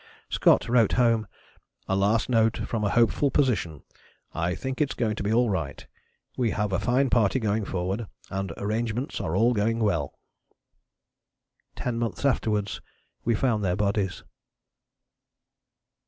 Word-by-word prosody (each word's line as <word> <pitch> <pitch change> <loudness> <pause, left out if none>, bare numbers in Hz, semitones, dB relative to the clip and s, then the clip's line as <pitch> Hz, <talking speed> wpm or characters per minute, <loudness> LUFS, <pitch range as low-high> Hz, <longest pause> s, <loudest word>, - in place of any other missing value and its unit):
Scott - - +4
wrote 115 -3 +3
home: 115 -4 +2 0.6
"A 95 - +1
last 100 +3 +2
note 115 -2 +2
from 110 -2 -2
a 105 - +2
hopeful 120 +5 +3
position. 110 - 0 0.5
I 85 +2 -1
think 130 +2 -4
it's 145 - 0
going 110 -3 0
to - - -3
be 100 +1 -1
all 120 +2 +3
right. 80 -7 -4 0.5
We 120 -3 +1
have 105 -2 -1
a 95 - +1
fine 130 +2 +1
party 115 +2 +3
going 110 -2 0
forward 95 +5 -3 0.2
and 95 -2 -3
arrangements 115 +5 -2
are 80 - -2
all 115 +5 +4
going 115 +1 +1
well." 85 -11 -1 1.6
Ten 120 -2 -3
months 120 +3 -3
afterwards 105 -6 0 0.4
we 115 - +2
found 110 -3 +1
their 90 -2 +1
bodies. 100 -2 -1
110 Hz, 140 wpm, -26 LUFS, 100-120 Hz, 1.6 s, Scott